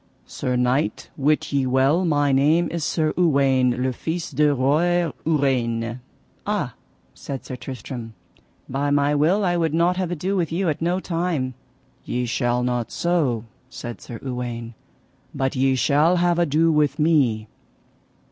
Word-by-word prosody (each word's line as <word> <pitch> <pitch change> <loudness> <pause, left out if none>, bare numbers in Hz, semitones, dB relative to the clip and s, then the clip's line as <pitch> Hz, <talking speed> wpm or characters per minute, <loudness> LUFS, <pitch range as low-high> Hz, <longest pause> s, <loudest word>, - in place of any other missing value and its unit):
Sir 125 -1 -3
knight, 125 +4 0
wit 150 +1 0
ye 135 -2 +1
well 135 +7 +3
my 145 -3 +2
name 155 +5 +3
is 170 -1 -3
Sir 155 0 0
Uwaine 135 -7 +2
le 130 0 0
Fise 165 +6 -4
de 150 -1 +3
Roy 160 +6 +2 0.2
Ureine. 120 -6 0 0.4
Ah, - - -2 0.4
said 135 -2 -7
Sir 130 - -6
Tristram, 120 -2 -7 0.5
by 140 +2 -1
my 145 0 +2
will 170 +8 +2
I 175 -1 +1
would 160 -2 0
not 175 +2 +2
have 185 -2 -1
ado 180 +3 -2
with 170 -4 0
you 175 +1 0
at 150 - -2
no 175 +3 +1
time. 165 -8 -2 0.5
Ye 125 0 -2
shall 120 +1 0
not 125 -2 -1
so, 150 -11 0 0.3
said 120 -4 -8
Sir 115 - -8
Uwaine, 120 -3 -5 0.6
but 135 0 -1
ye 130 0 +2
shall 150 +6 +3
have 175 -1 +2
ado 165 0 +3
with 150 -2 +2
me. 140 -9 +2
145 Hz, 150 wpm, -23 LUFS, 125-165 Hz, 0.6 s, well